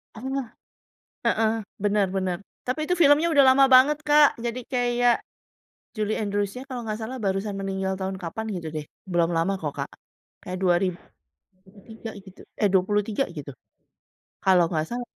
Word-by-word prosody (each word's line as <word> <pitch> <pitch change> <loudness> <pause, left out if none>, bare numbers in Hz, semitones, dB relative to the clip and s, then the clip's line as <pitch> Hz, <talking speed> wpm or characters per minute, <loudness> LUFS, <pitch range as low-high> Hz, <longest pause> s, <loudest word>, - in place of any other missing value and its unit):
Oh, 265 +3 -3 0.8
heeh, 220 0 +2 0.3
benar 205 -1 +2
benar. 185 -2 -1 0.3
Tapi 255 +5 -2
itu - - +4
filmnya 315 +1 +5
udah 285 -4 +5
lama 275 0 +6
banget, 265 +3 +6
Kak. 295 -1 +5
Jadi 235 +1 -3
kayak, 245 -1 +2 0.7
Julie 215 -1 -1
Andrewsnya 205 +4 -2
kalau 255 -3 -6
nggak 215 - -2
salah, 255 +4 -5
barusan 195 +1 -1
meninggal 190 0 -2
tahun 190 0 -3
kapan, 185 +5 -5
gitu 165 -2 -6
deh, 155 -1 -4 0.2
Belum 175 -3 +1
lama 180 +4 +1
kok, 150 -3 -3
Kak. - - -3 0.5
Kayak 185 0 -6
2003 185 - -4
gitu, 190 -1 -16 0.2
eh, 205 - +4
23 205 +6 +1
gitu, 145 -3 -8 0.9
kalau 180 -3 +5
nggak 155 -3 -1
salah. 245 +1 -4
205 Hz, 145 wpm, -25 LUFS, 185-245 Hz, 0.9 s, lama